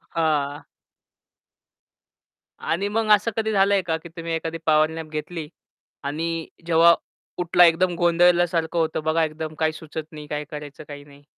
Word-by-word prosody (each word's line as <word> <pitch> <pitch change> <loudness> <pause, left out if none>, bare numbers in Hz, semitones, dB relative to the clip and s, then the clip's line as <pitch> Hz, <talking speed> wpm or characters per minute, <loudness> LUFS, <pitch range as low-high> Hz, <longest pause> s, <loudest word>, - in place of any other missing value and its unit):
हां. 150 -3 0 2.0
आणि 195 +5 -1
मग 220 +1 -1
असं 210 +3 -3
कधी 220 -1 0
झालंय 200 -1 +3
का 165 -2 -1
की 160 - -11
तुम्ही 165 0 -6
एखादी 165 0 -3
पॉवर 155 0 +4
नॅप 160 -1 -7
घेतली 155 +1 -5 0.6
आणि 165 +3 -3 0.2
जेव्हा 170 0 +6 0.5
उठला 175 0 +5
एकदम 175 +1 +3
गोंधळल्यासारखं 175 -1 +3
होतं 160 -1 -1
बघा 160 +1 +2
एकदम 155 0 -4
काही 160 0 +1
सुचत 160 0 -7
नाही 150 -2 -10
काय 150 0 -3
करायचं 150 -1 -8
काही 145 -1 -9
नाही? 145 0 -18
165 Hz, 150 wpm, -23 LUFS, 155-175 Hz, 2.0 s, जेव्हा